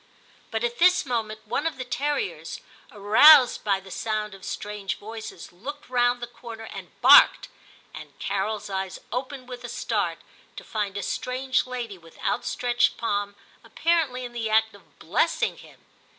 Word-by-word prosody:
But 225 0 -3
at 240 0 -2
VIII 355 +2 +8
TIM 360 -6 -3
171 220 -3 -1
this 215 - -24
moment - - -31
one 290 +8 -1
of 325 - -4
the 255 - -5
terriers, 290 - -3 0.3
roused 245 +7 +7
by 200 -2 +1
the 190 0 -14
sound 215 -1 -3
of 195 -1 -13
strange 210 -1 -4
voices, 220 -4 -9
looked 280 +11 -8
round 245 -1 +2
the - - -2
corner 230 -2 -10
and - - -10
barked, - - +7 0.4
and - - -11
Carol's 205 +2 -2
eyes 190 -1 -4
opened 255 +1 -5
with 250 -1 -8
a 240 - -6
start, - - -1 0.4
to - - -8
find 205 -2 -3
a 200 - -3
strange 255 +3 -1
lady 235 -6 -5
with 165 -1 -18
out - - 0
stretched 245 -1 +1
palm, 205 -2 -2 0.3
apparently 310 -7 0
in 240 - -9
the 230 -2 -3
act 220 0 +3
of 200 - -20
blessing - - 0
him. - - -17
230 Hz, 175 wpm, -25 LUFS, 205-255 Hz, 0.4 s, VIII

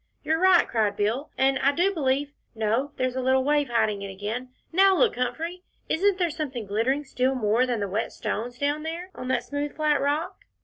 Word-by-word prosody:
"You're 320 +1 +1
right," 375 -1 +5
cried 210 -3 0
Bill, 230 +8 -1
"and 270 0 +3
I 275 +1 +3
do 365 +6 +2
believe 285 -2 0 0.2
no, 225 +6 0
there's 255 0 -1
a 260 - -1
little 260 +1 +3
wave 290 0 +2
hiding 220 -4 +1
it 200 - -5
again 215 +6 -5 0.2
now, 385 +1 +5
look, 475 - +3
Humphrey 315 +9 -3 0.3
isn't 390 +3 +2
there 350 -3 +1
something 280 -8 -4
glittering 230 +8 0
still 265 -1 0
more 235 +1 +2
than 240 -4 -1
the 200 - -1
wet 205 +4 -2
stones, 240 +3 -4
down 290 +2 0
there 335 +4 -5
on 255 - -7
that 260 - 0
smooth 285 0 -4
flat 305 -2 +2
rock?" 295 - -1
265 Hz, 205 wpm, -26 LUFS, 235-310 Hz, 0.3 s, right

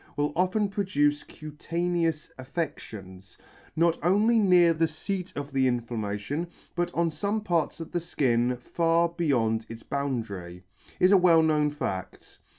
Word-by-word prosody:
will 145 0 0
often 185 +4 +1
produce 150 -8 +1
cutaneous 165 +1 -3
affections, 105 - -6 0.4
not 170 0 +2
only 210 +6 +4
near 180 -4 +5
the 165 0 +1
feat 180 +4 -5
of 145 0 -5
the 135 -1 +3
inflammation, 120 +4 -2 0.3
but 175 0 -1
on 170 0 +2
fome 205 +6 -2
parts 170 -4 0
of 165 - -7
the 175 - -2
{kin 125 -2 +2
far 170 +5 +1
beyond 125 -10 0
its 115 0 -9
boundary, 110 -11 -4 0.4
is 185 - +5
a 200 - +8
well 170 -3 +5
known 150 -2 +2
faCt. 95 -11 -6
155 Hz, 140 wpm, -27 LUFS, 125-175 Hz, 0.4 s, a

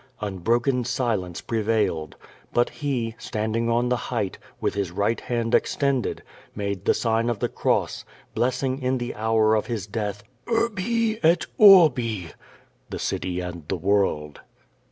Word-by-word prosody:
Unbroken 115 +6 0
silence 115 - -2
prevailed. 105 -8 -1 0.4
But 120 - +2
he, 125 -6 -2
standing 110 +2 -2
on 120 +1 +1
the 125 - +2
height, 110 -6 -2 0.2
with - - -1
his 100 -3 -2
right 100 +5 0
hand 115 -1 -2
extended, 140 -3 +1 0.3
made 100 -2 -3
the - - +3
sign 115 0 +1
6i 120 -2 0
the - - -1
cross, - - 0 0.3
blessing 130 +3 0
in 130 0 +1
the 120 0 -4
hour 110 0 +2
of 110 -1 +1
his 110 -6 -3
death 105 -1 -4
— - - -40
"Urbi 230 0 0
et 165 +2 +3
Orbi!" 130 - +6 0.6
(The - - -5
City 90 -1 -2
and 85 -3 -7
the 95 - -1
World). 90 -6 0
115 Hz, 145 wpm, -24 LUFS, 100-125 Hz, 0.6 s, Orbi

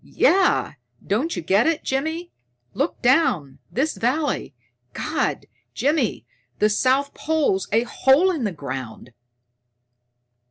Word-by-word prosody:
Yeah, 380 0 +2 0.3
don't 255 - -1
you - - -4
get 195 - +3
it, 325 -2 0
Jimmy? 320 +6 -2 0.4
Look 280 +1 -2
down! 210 - +2
This 290 +6 -1
valley 260 - -1 0.4
God, 310 +1 -2 0.3
Jimmy, 260 - 0 0.3
the 210 0 +2
south 265 +5 +1
pole's 295 -12 0
a 225 +3 +3
hole 270 +9 +3
in 315 -8 -3
the 210 - 0
ground!" 130 -6 -7
265 Hz, 115 wpm, -22 LUFS, 200-315 Hz, 0.4 s, get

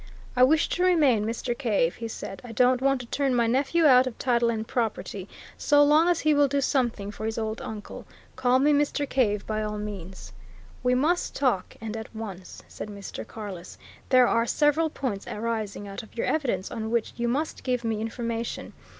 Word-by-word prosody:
"I 250 - +2
wish 305 +5 +4
to 360 - 0
remain 285 - +4
Mr. 240 +1 -2
Cave," 210 -10 +1
he 230 - -4
said. 195 -3 -7
"I 240 -2 -8
don't 250 +2 +3
want 275 -1 +2
to - - -9
turn 270 +1 0
my 235 -1 +3
nephew 275 +8 +2
out 255 -2 +7
of 245 - -6
title 240 -2 +2
and 220 -1 -2
property, 210 -4 -3 0.3
so 290 -1 +5
long 305 +4 +5
as 345 -2 +2
he 310 0 +3
will 290 -1 +4
do 280 +1 0
something 240 -7 0
for 215 +1 -5
his 220 - -3
old 220 0 -3
uncle. 210 -1 -8 0.3
Call 255 0 +3
me 290 +3 +4
Mr. 290 0 +1
Cave, 210 -7 +1
by 215 0 -2
all 210 0 -3
means." 195 -3 -7 0.5
"We 250 0 +2
must 320 +7 +1
talk 250 -9 0
and 225 -1 -5
at 220 0 -8
once," 195 -5 -8
said - - -8
Mr. 200 -1 -7
Carless. 195 -5 -8 0.3
"There 255 -2 +6
are 230 0 +2
several 305 +4 +2
points 240 -9 -4
arising 215 -2 -3
out 195 - -6
of 220 - -17
your - - 0
evidence 245 -12 -1
on 220 -1 -4
which 235 -1 -1
you 235 0 -1
must 290 +6 -2
give 250 -2 -1
me 220 -2 -1
information. 230 0 -4
235 Hz, 200 wpm, -26 LUFS, 215-275 Hz, 0.5 s, out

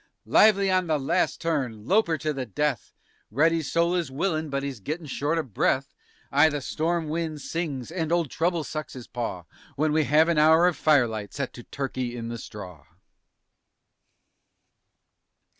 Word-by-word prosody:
Lively 200 -2 +5
on 185 -1 +2
the 155 -1 +2
last 135 - 0
turn! 130 -10 -2
lope 205 - +3
'er 160 - +1
to 155 +2 -2
the 130 -3 -4
death! 140 +3 -2 0.4
(Reddy's 160 +5 +1
soul 170 +1 +2
is 175 -5 -1
willin' 155 +2 -1
but 140 0 -2
he's 140 -4 -4
gettin' 155 - -5
short 145 +3 -1
o' 165 - 0
breath.) 135 +3 0 0.4
Ay, 145 +3 +5
the 145 -1 -2
storm 160 +4 -1
wind 160 -1 -3
sings 150 -5 -4
and 165 -2 -2
old 170 -5 +1
trouble 170 0 0
sucks 155 0 -6
his 125 -3 -9
paw 115 -7 -4 0.3
_When 150 +1 +1
we 155 -1 +2
have 155 +3 +4
an 170 -3 +2
hour 160 +3 +6
of 180 -2 +2
firelight 115 -9 +1
set 140 -2 -3
to 120 - -9
"Turkey 130 -2 -4
in 115 0 -5
the 115 0 -5
Straw!" 90 -10 -10
150 Hz, 170 wpm, -26 LUFS, 130-165 Hz, 0.4 s, hour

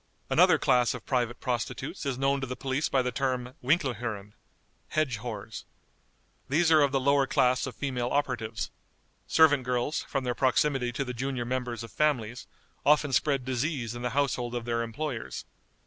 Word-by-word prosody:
Another - - +6
class 125 -1 +3
of 120 - -9
private 120 -2 0
prostitutes 130 - -3
is 130 -3 -1
known 135 +1 +1
to 135 - -3
the 125 - -4
police 135 +3 -1
by 130 -2 +2
the 125 - -1
term 130 -2 -2
"Winklehuren" 120 - -1 0.5
(hedge 150 -7 0
w 110 -2 -6 0.5
). - - -40
These 160 +4 +3
are 155 -1 +7
of 140 -1 +3
the 135 - +2
lower 140 +1 +3
class 125 +2 +2
of 130 - -7
female 125 -4 -2
operatives. 120 -6 -2 0.6
Servant 150 -4 +5
girls, 125 +4 -1
from 135 -2 -1
their 125 -1 0
proximity 130 0 +2
to 135 +3 -2
the 125 - -4
junior 130 0 -3
members 125 -1 -3
of 115 - -9
families, 125 -6 0 0.4
often 150 -1 +3
spread 135 -1 +2
disease 130 -2 -2
in 120 - -7
the 125 - -1
household 125 -4 0
of 120 -1 -3
their 115 -1 0
employers. 115 - -4
130 Hz, 175 wpm, -28 LUFS, 120-140 Hz, 0.6 s, are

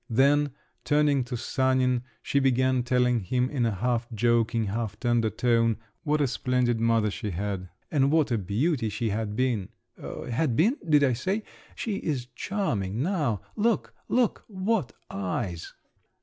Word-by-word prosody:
Then, 140 +4 +3 0.3
turning 145 -2 +3
to 125 -1 -4
Sanin, 130 0 +1 0.2
she 140 - +1
began 130 -1 +2
telling 125 0 +2
him 125 +6 0
in 125 -5 +1
a 110 - -1
half 120 +3 -1
joking, 115 0 +2
half 105 +1 -3
tender 120 -2 +2
tone 115 0 +2 0.2
what 150 -1 +1
a 140 - +3
splendid 125 -2 0
mother 115 -2 +2
she 105 - -4
had, 95 0 -3 0.2
and 140 -3 +3
what 155 -4 +3
a 115 - +2
beauty 115 - 0
she 110 +2 -2
had 105 0 -2
been. 120 -6 0 0.3
"'Had 125 +1 -2
been,' 220 - +3
did 150 -2 +5
I 130 -3 +3
say? 190 - -1 0.3
she 210 -4 -2
is 140 -9 -2
charming 120 - -2
now! 150 - 0
Look, 225 +1 +1 0.2
look, 245 -3 +1
what 190 - -1 0.2
eyes!" 95 -2 -3
125 Hz, 150 wpm, -27 LUFS, 110-145 Hz, 0.3 s, did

